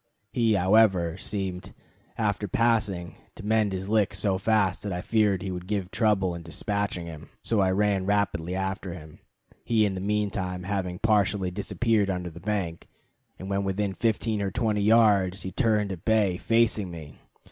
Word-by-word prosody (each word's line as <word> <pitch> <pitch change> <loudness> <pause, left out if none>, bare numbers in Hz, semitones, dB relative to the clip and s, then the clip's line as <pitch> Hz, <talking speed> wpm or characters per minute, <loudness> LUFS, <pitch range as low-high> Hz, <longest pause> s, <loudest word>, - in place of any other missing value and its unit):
He, 115 -3 +2
however, 95 -3 +3
seemed, 95 -2 -4 0.4
after 105 -2 -1
passing, 105 -5 0 0.2
to - - -10
mend 110 -1 +2
his 95 0 -4
licks 105 -2 +1
so 95 -1 +2
fast 105 -2 +1
that 100 - -4
I 90 - -2
feared 105 -2 +1
he 95 - -3
would 90 0 -6
give 100 -3 -2
trouble 100 -5 +1
in 85 - -6
despatching 90 +2 -2
him, 80 -3 -10
so 115 - +1
I 95 -1 +3
ran 100 0 +1
rapidly 95 -4 0
after 95 -1 -3
him, 80 -3 -12 0.4
he 110 -2 +2
in 100 - -1
the 95 - -5
mean 105 0 0
time 90 -2 -4
having 90 -2 -2
partially 100 -3 +1
disappeared 105 +2 0
under 90 -2 -3
the 85 - -11
bank; 90 -3 -3 0.5
and 95 - -8
when 100 0 -1
within 100 +1 -1
fifteen 110 -1 0
or 100 - 0
twenty 105 +1 0
yards 100 -4 +4
he 95 - -5
turned 105 0 +1
at 90 -3 -7
bay, 105 -5 +2
facing 110 -3 +1
me. 80 -4 -10
100 Hz, 175 wpm, -26 LUFS, 90-105 Hz, 0.5 s, yards